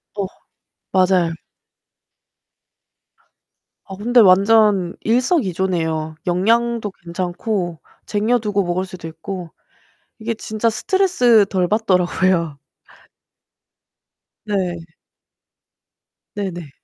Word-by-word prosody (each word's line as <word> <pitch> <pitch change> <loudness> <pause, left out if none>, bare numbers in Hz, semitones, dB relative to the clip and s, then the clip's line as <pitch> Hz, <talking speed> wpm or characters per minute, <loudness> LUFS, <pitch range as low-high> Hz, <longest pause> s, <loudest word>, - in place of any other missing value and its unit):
어 200 - -1 0.7
맞아요. 185 -3 +3 2.5
아 195 - -8
근데 240 +5 +2
완전 200 -2 +4
일석이조네요. 185 - 0
영양도 225 +4 +1
괜찮고 175 0 -4 0.3
쟁여두고 210 -1 0
먹을 180 +1 -1
수도 180 -3 -9
있고 165 +2 -7 0.7
이게 225 +1 -3
진짜 220 +1 -1
스트레스 245 - +3
덜 185 -2 0
받더라고요. 180 -6 +1 1.9
네. 185 -5 -1 1.6
네네. 180 -6 -5
190 Hz, 170 characters per minute, -20 LUFS, 175-220 Hz, 2.5 s, 완전